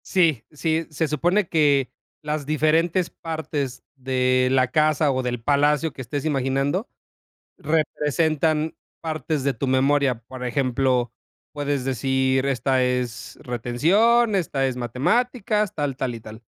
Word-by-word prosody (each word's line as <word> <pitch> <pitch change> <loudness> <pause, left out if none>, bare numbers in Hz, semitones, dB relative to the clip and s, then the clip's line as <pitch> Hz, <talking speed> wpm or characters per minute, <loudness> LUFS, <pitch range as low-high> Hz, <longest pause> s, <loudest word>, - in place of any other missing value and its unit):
Sí, 165 - +2
sí, 160 +2 -1
se 155 +1 -1
supone 175 +7 +1
que 145 -5 +2 0.3
las 150 -1 -3
diferentes 160 +4 +2
partes 155 -5 -4
de 130 -1 +1
la 130 -1 +3
casa 155 -1 +3
o 130 -1 0
del 125 -2 -3
palacio 150 +3 +2
que - - -8
estés 135 +4 -4
imaginando 140 - 0 0.7
representan 155 +1 0 0.3
partes 155 -3 -2
de 140 - +2
tu 130 +2 -4
memoria. 130 -1 +2
Por 125 +2 -9
ejemplo, 125 -1 0 0.4
puedes 145 -2 -2
decir: 130 +1 +1
"Esta 130 0 +1
es 125 -2 -2
retención, 185 - +2
esta 145 -8 0
es 130 -1 -2
matemáticas, 210 - 0
tal, 145 -3 -2
tal 130 -2 -2
y 115 - -8
tal", 110 +1 -11
140 Hz, 130 wpm, -23 LUFS, 130-160 Hz, 0.7 s, la